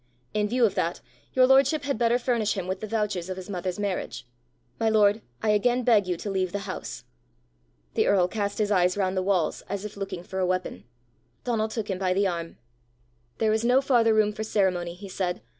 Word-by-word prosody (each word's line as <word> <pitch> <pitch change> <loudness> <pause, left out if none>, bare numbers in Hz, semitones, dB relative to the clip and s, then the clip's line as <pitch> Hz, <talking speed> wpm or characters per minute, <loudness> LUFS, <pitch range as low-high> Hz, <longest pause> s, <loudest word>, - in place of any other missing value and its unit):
In 210 0 +1
view 245 +1 +3
of 200 - +1
that, 175 -3 -1 0.3
your 255 -1 +6
lordship 275 +3 +4
had 280 -5 -2
better 235 0 +3
furnish 235 -4 0
him 190 - -2
with 185 +1 -3
the 215 - -5
vouchers 210 -5 -2
of 185 - -4
his 185 +2 -7
mother's 180 -1 -3
marriage. 200 -9 -3 0.5
My 225 -1 +2
lord, 215 0 +4 0.2
I 215 - +1
again 245 +4 +2
beg 215 -5 +4
you 180 -1 -1
to 205 - -5
leave 185 -1 -1
the 200 -1 -3
house." 185 - -6 0.9
The - - +2
earl 185 -3 +4
cast 200 0 -3
his 210 -1 0
eyes 180 -1 +3
round 190 -1 0
the 185 - +1
walls 185 -3 0
as 200 +1 -3
if 210 - -7
looking 195 -3 -5
for 190 +1 -5
a 185 - +2
weapon. 180 - -2 0.6
Donal 225 -3 0
took 220 -1 -4
him 190 -2 -3
by 185 -1 +1
the 200 +1 +2
arm. 170 -3 -3 0.8
"There 220 -1 +2
is 220 +1 0
no 250 +2 +4
farther 235 -5 +3
room 210 -1 +3
for 215 +1 -4
ceremony," 180 -5 0
he 200 +2 -10
said. 180 -2 -3
205 Hz, 215 wpm, -26 LUFS, 185-220 Hz, 0.9 s, your